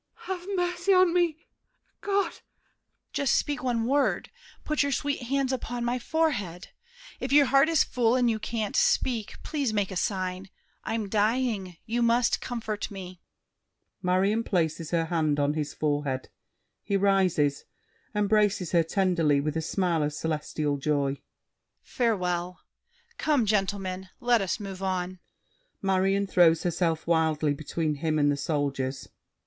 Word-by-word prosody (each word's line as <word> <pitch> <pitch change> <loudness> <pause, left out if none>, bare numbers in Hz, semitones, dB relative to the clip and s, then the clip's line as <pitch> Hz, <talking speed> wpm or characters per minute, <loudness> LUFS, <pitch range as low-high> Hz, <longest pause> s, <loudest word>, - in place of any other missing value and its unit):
MARION 370 -2 -3
(inaudibly). 355 - +2
Have - - -1
mercy 355 +2 +1
on 365 -2 +5
me—God! 360 +3 -2
DIDIER. - - -16 0.7
Just 280 -3 +2
speak 290 0 0
one 240 -3 0
word; 280 +3 +1 0.3
put 305 -1 0
your 280 0 +1
sweet 280 +1 -1
hands 270 0 0
upon 240 -1 -3
My 245 +1 0
forehead. 235 - -1 0.5
If 260 - -4
your 285 0 +7
heart 275 +4 +4
is 325 -3 +4
full 240 -1 +1
and 250 -1 +3
you 225 -2 +1
Can't 215 -1 -3
speak, 230 -5 +1
please 285 -6 -1
make 205 -2 0
a - - -5
sign. 185 0 -2 0.3
I'm 220 -2 -2
dying; 210 -3 0
you 235 +2 -1
Must 235 +1 +2
comfort 220 -4 -4
me. 185 -3 -9 0.8
[Marion 195 +4 +2
places 165 -5 -1
her 165 -1 +1
hand 155 -3 0
on 145 +1 +2
his 150 -2 -3
forehead; 145 -3 -2 0.5
he 200 - 0
rises, 185 -8 +2 0.5
embraces 210 -3 +2
her 170 - +4
tenderly, 165 -4 +2
with 150 +2 -2
a 160 - 0
smile 170 0 0
of 150 0 -1
celestial 150 -2 -2
joy. 140 -1 -1 0.6
Farewell! 180 -6 -1 0.6
Come, 290 -7 +2
gentlemen! 195 -2 -1
Let 240 -2 +3
us 190 +2 -1
move 195 -2 -7
on! 185 -1 -2 0.6
MARION 195 +1 +2
(throws 175 -4 +4
herself 170 -2 0
wildly 160 -3 +2
between 155 +2 -2
him 160 -2 +1
and 145 -1 +3
the - - +1
Soldiers). 140 -3 -2
195 Hz, 145 wpm, -27 LUFS, 165-240 Hz, 0.8 s, your